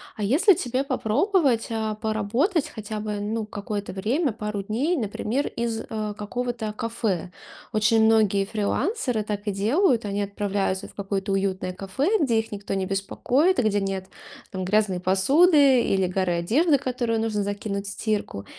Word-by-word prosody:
А 210 - -4
если 320 - +5
тебе 260 -5 -1
попробовать, 270 - +1
а, 220 -1 -1
поработать 220 - 0
хотя 215 0 -6
бы, 210 -1 -3
ну, 215 +2 -2
какое-то 205 -1 -5
время, 240 - 0
пару 210 -2 -4
дней, 265 - 0
например, 235 +3 -2
из, 230 -1 -3
а, 215 -2 -4
какого-то 225 +1 -3
кафе? 210 -6 -2 0.4
Очень 220 +1 +4
многие 215 -3 +3
фрилансеры 240 - -1
так 205 0 -4
и 205 - 0
делают. 235 - +2
Они 205 0 -2
отправляются 200 -1 -2
в - - -18
какое-то 195 -1 -2
уютное 195 -1 -1
кафе, 230 - 0
где 235 -8 +2
их 225 - -5
никто 205 -1 -5
не 190 -1 -1
беспокоит 250 - +1
и - - +3
где 205 -2 +2
нет, 195 -1 -3 0.4
там, 185 -1 -4
грязной 200 -1 +1
посуды 270 - +5
или 190 -1 +1
горы 185 -1 0
одежды, 280 - +3
которую 245 -4 -1
нужно 215 -2 -1
закинуть 200 0 -3
в 200 - -4
стирку. 205 - -3
215 Hz, 160 wpm, -25 LUFS, 200-245 Hz, 0.4 s, если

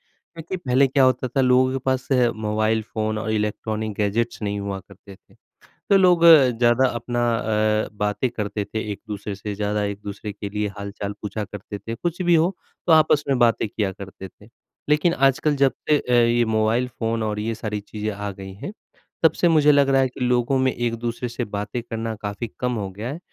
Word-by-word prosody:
क्योंकि 165 +3 -8
पहले 135 -4 +2
क्या 135 0 +3
होता 130 0 +2
था 135 +3 0
लोगों 130 0 +4
के 135 - -1
पास 130 -1 0 0.4
मोबाइल 110 +1 +1
फ़ोन 110 0 -1
और 110 0 -3
इलेक्ट्रॉनिक 110 0 -2
गैजेट्स 115 +4 -1
नहीं 100 -1 -2
हुआ 100 -1 -4
करते 100 +1 -15
थे, - - -27 0.6
तो 200 - +7
लोग 180 -3 +4
ज़्यादा 125 -5 +6
अपना 120 +1 -3 0.2
अ, 110 -1 0
बातें 105 +4 -1
करते 105 -2 -3
थे 110 - -4
एक-दूसरे 105 0 -6
से, 100 +1 -6
ज़्यादा 105 0 -1
एक-दूसरे 100 +1 -5
के 100 0 -6
लिए 105 0 -2
हाल-चाल 100 0 -5
पूछा 105 +1 -3
करते 105 0 -8
थे 115 - -6
कुछ 175 +7 -4
भी 175 -1 +3
हो 170 +4 +3 0.3
तो 170 - +4
आपस 155 -2 +4
में 135 -2 +2
बातें 115 -2 +3
किया 100 -2 -2
करते 95 0 -9
थे। 105 +4 -20 0.4
लेकिन 150 +3 +3
आजकल 140 +2 +2
जब 135 -1 +3 0.2
से 150 - +5
अ, 125 - -4
ये 120 0 +4
मोबाइल 110 +2 +1
फ़ोन 115 -2 -2
और 105 -1 -2
ये 115 +1 -2
सारी 105 -1 -4
चीज़ें 105 +1 -5
आ 105 0 -5
गई 95 0 -9
हैं, 185 - -7 0.5
तब 160 - +6
से 175 - +2
मुझे 150 -2 +5
लग 140 -1 +4
रहा 135 0 +4
है 130 - +2
कि 125 - -13
लोगों 125 +1 +2
में 130 0 +2
एक-दूसरे 120 +1 -3
से 120 +1 -4
बातें 105 +3 -4
करना 115 -1 -4
काफ़ी 105 +3 -4
कम 125 0 0
हो 95 - -3
गया 105 +5 -6
है। 160 - -6
115 Hz, 200 wpm, -23 LUFS, 105-130 Hz, 0.6 s, तो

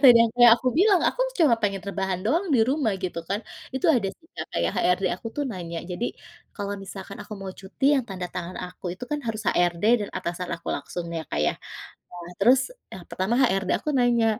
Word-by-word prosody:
tadi 245 -3 +10
yang 225 - -1
kayak 240 -1 +9
aku 255 - -1
bilang 390 -2 +5
aku - - -4 0.2
cuma 300 -8 +6
pengen 195 -3 -1
rebahan 190 -2 -2
doang 335 - +1
di 235 - +5
rumah 265 -4 +1
gitu 175 -2 -3
kan 200 +2 -1 0.3
itu 265 - -3
ada 210 -6 +1
sih 330 - -26
Kak - - -4
kayak - - +1
HRD 180 +2 +2
aku 230 - -9
tuh 290 - 0
nanya 170 -4 -5
jadi, 220 +7 -2 0.5
kalau 200 -1 -3
misalkan 195 0 -8
aku - - -11
mau 190 -1 -5
cuti 195 +7 -6
yang 265 -3 +1
tanda 185 -2 -4
tangan 180 0 -5
aku 180 +1 -12
itu 250 - -6
kan 295 0 -1
harus 220 -1 -2
HRD 175 0 +1 0.2
dan 205 - -3
atasan 175 +1 -4
aku - - -10
langsung 175 - -4
ya 165 - -3
Kak 75 - -1
ya - - +2 0.7
nah 175 +1 -9
terus 245 +6 +6 0.3
yang 185 - -8
pertama 190 +5 -1
HRD 195 -6 +2
aku - - -3
nanya, 240 -2 +3
200 Hz, 215 wpm, -25 LUFS, 180-245 Hz, 0.7 s, tadi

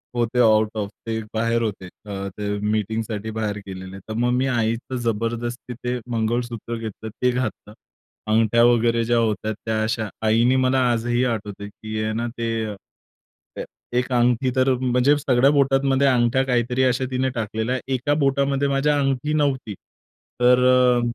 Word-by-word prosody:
होते 120 +1 0
आऊट-ऑफ, 110 -2 +2 0.2
ते 110 0 -1
बाहेर 115 +1 +1
होते, 100 -4 -3
ते 100 0 -5
अ, - - -5
मीटिंगसाठी 110 0 -2
बाहेर 105 -2 -2
गेलेले. 95 0 -8
तर 110 +3 -8
मग 120 +2 +1
मी 130 +2 +1
आईचं 120 +1 -1
जबरदस्ती 120 +2 -3
ते 125 +1 -3
मंगळसूत्र 115 0 -2
घेतलं 110 0 -7
ते 125 +4 0
घातलं. 125 -4 -4 0.6
अंगठ्या 115 +1 +4
वगैरे 115 -1 +3
ज्या 120 0 +2
होत्या, 110 -1 0
त्या 110 +1 -3
अशा. 110 0 -1 0.2
आईने 120 +4 +3
मला 130 0 +2
आजही 120 +2 0
आठवतं 105 -3 -4
की 110 +1 -5
आहे 110 0 -1
ना 120 +1 -2
ते, 115 -1 -2 0.2
ए - - -7 0.9
ए - - -5 0.3
एक 125 +1 -3
अंगठी 125 +1 +2
तर 130 +1 +3
म्हणजे 125 +3 +3
सगळ्या 135 -1 +3
बोटांमध्ये 135 -1 +2
अंगठ्या 125 +1 +3
काहीतरी 125 +1 +1
अशा 130 +1 +1
तिने 130 +1 0
टाकलेल्या, 110 +3 -2 0.2
एका 145 +4 0
बोटामध्ये 140 +1 +1
माझ्या 145 +1 +1
अंगठी 135 +2 0
नव्हती. 135 -7 0 0.7
तर 125 +1 +6
अ, 125 -1 +4
120 Hz, 155 wpm, -22 LUFS, 110-130 Hz, 0.9 s, तर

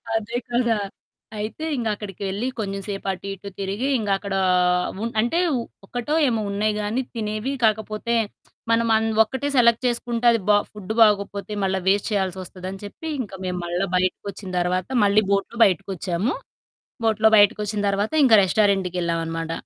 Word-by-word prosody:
అదే 225 +2 -2
కదా! 235 -2 +2 0.6
అయితే 215 +9 -5
ఇంక 235 -3 -2
అక్కడికెళ్ళి 200 +3 -4
కొంచెంసేపు 195 -1 -4
అటు, 190 +1 -8
ఇటు 195 +1 -9
తిరిగి 200 +7 -2
ఇంగ 210 -3 -3
అక్కడ 200 0 -6 0.7
ఉన్ 230 - -2
అంటే 285 +10 0 0.5
ఒక్కటో 245 +8 -2
ఏమో 225 -3 0
ఉన్నాయి 210 +2 0
గానీ 220 +5 -1
తినేవి. 215 +3 -2
కాకపోతే 220 +2 +1 0.6
మనం 230 0 +3
అన్ 220 0 0 0.2
ఒక్కటే 265 +5 -4
సెలెక్ట్ 235 -1 +4
చేసుకుంటే 240 0 -1
అది 230 - +2
బా 205 - +7
ఫుడ్ 210 -1 -7
బాగకపోతే 205 -1 +3
మళ్ళా 190 0 +1
వేస్ట్ 200 +1 +2
చేయాల్సొస్తదని 190 -1 -3
చెప్పి 260 +10 -8
ఇంక 205 - -7
మేము 180 0 -2
మళ్ళా 175 +3 -1
బయటకొచ్చిన 185 +1 -2
తర్వాత 180 +1 0 0.2
మళ్ళీ 205 +1 +4
బోట్‌లో 200 +4 0
బయటికొచ్చాము. 190 - -1 0.7
బోట్‌లో 220 0 +4
బయటికొచ్చిన 210 0 +3
తర్వాత 200 +2 -1
ఇంకా 230 -4 +7
రెస్టారెంట్‌‌కెళ్ళామనమాట. 175 -5 0
205 Hz, 135 wpm, -23 LUFS, 190-225 Hz, 0.7 s, బా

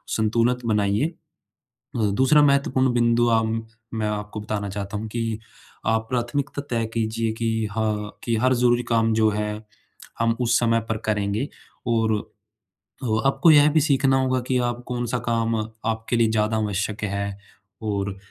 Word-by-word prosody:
संतुलन 115 +3 +2
बनाइए। 105 +2 +2 0.9
अ, 110 -3 +1
दूसरा 130 +7 +4
महत्वपूर्ण 140 -2 +3
बिंदु 120 0 +3
अम, 115 -1 +1 0.3
मैं 110 -1 -1
आपको 105 0 -4
बताना 105 -1 -3
चाहता 100 +1 -5
हूँ 110 +2 -4
कि, 115 -1 -2 0.5
आप 110 0 +1
प्राथमिकता 130 +4 -2
तय 115 -2 0
कीजिए 115 0 -1
कि 115 -1 0
हाँ 105 -1 -2
कि, 115 -2 0
हर 130 +3 +3
ज़रूरी 120 0 +3
काम 115 -1 +3
जो 110 0 +4
है, 105 0 -2 0.7
हम 115 0 +2
उस 120 0 +3
समय 115 -1 +2
पर 110 - 0
करेंगे 105 +4 0 0.4
और 115 -1 +2 0.9
ओ 110 -1 +1
आपको 135 +4 +4
यह 150 -1 +7
भी 155 - +4
सीखना 135 -2 +3
होगा 130 0 +1
कि 130 - +2
आप 120 0 -4
कौन-सा 120 0 -2
काम, 115 -1 +1 0.3
आपके 115 +1 -1
लिए 115 -1 +3
ज़्यादा 110 0 +1
आवश्यक 105 0 -2
है 100 0 -3 0.5
और 100 -2 -2
115 Hz, 155 wpm, -23 LUFS, 105-120 Hz, 0.9 s, यह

